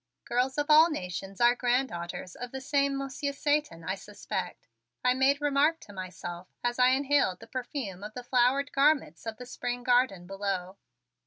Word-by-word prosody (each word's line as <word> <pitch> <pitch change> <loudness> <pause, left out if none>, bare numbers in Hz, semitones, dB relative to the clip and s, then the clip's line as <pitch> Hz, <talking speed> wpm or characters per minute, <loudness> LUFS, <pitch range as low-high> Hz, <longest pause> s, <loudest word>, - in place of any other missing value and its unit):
"Girls 255 +3 0
of 295 - +1
all 310 +2 +7
nations 195 - -5
are 240 0 +6
granddaughters 240 -9 -1
of 245 - -7
the 265 - -5
same 280 0 +1
Monsieur 275 +1 -3
Satan, 290 - 0
I 185 - -1
suspect," 190 -2 -6 0.4
I 250 - +4
made 265 +2 +3
remark 295 +3 +2
to 205 - -13
myself 180 -1 -7 0.2
as 240 +1 -1
I 250 - +7
inhaled 265 -7 +2
the 225 - -11
perfume 240 - -5
of 215 +1 -8
the 250 - -6
flower 250 +2 +3
garments 280 - +1
of 220 -1 -4
the 250 - -8
spring 245 0 -4
garden 245 -8 +2
below. 195 -1 -3
245 Hz, 170 wpm, -29 LUFS, 195-275 Hz, 0.4 s, all